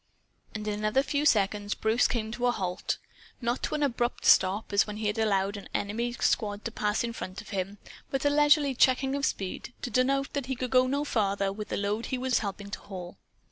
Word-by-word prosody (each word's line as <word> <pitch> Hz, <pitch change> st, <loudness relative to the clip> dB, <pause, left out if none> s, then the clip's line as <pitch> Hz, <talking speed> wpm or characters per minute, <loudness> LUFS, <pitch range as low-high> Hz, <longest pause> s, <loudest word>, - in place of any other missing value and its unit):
And 215 Hz, 0 st, -4 dB
in 210 Hz, -, 0 dB
another 215 Hz, +6 st, +2 dB
few 290 Hz, +1 st, +1 dB
seconds 205 Hz, -3 st, +2 dB
Bruce 220 Hz, +3 st, +2 dB
came 220 Hz, -3 st, -2 dB
to 245 Hz, +1 st, 0 dB
a -, -, +4 dB
halt 185 Hz, -6 st, -2 dB, 0.4 s
not 240 Hz, +1 st, -1 dB
to -, -, -1 dB
an 300 Hz, -, 0 dB
abrupt 240 Hz, -3 st, -1 dB
stop, 195 Hz, +3 st, +4 dB
as 200 Hz, -, +4 dB
when 210 Hz, 0 st, -5 dB
he 215 Hz, -, -4 dB
had 210 Hz, +1 st, 0 dB
allowed 200 Hz, -2 st, +1 dB
an 200 Hz, -, -10 dB
enemy 230 Hz, +4 st, -1 dB
squad 210 Hz, -3 st, 0 dB
to 230 Hz, -, -2 dB
pass 210 Hz, 0 st, 0 dB
in 235 Hz, 0 st, -3 dB
front 185 Hz, -4 st, -6 dB
of -, -, -10 dB
him, 195 Hz, 0 st, -3 dB, 0.3 s
but 270 Hz, +1 st, -2 dB
a 290 Hz, -, +4 dB
leisurely 295 Hz, -1 st, +4 dB
checking 260 Hz, +1 st, +3 dB
of 280 Hz, -1 st, +1 dB
speed, 195 Hz, +5 st, -4 dB
to 245 Hz, -, -3 dB
denote 275 Hz, +4 st, +1 dB
that 280 Hz, -3 st, -2 dB
he 265 Hz, -, -1 dB
could 250 Hz, 0 st, -4 dB
go 255 Hz, 0 st, +5 dB
no 280 Hz, +2 st, 0 dB
farther 200 Hz, -5 st, 0 dB
with 210 Hz, +1 st, -6 dB
the -, -, -2 dB
load 205 Hz, +3 st, -1 dB
he 260 Hz, -, -2 dB
was 255 Hz, 0 st, +1 dB
helping 200 Hz, -1 st, -5 dB
to -, -, -4 dB
haul. 180 Hz, -3 st, -9 dB
220 Hz, 225 wpm, -28 LUFS, 205-255 Hz, 0.4 s, go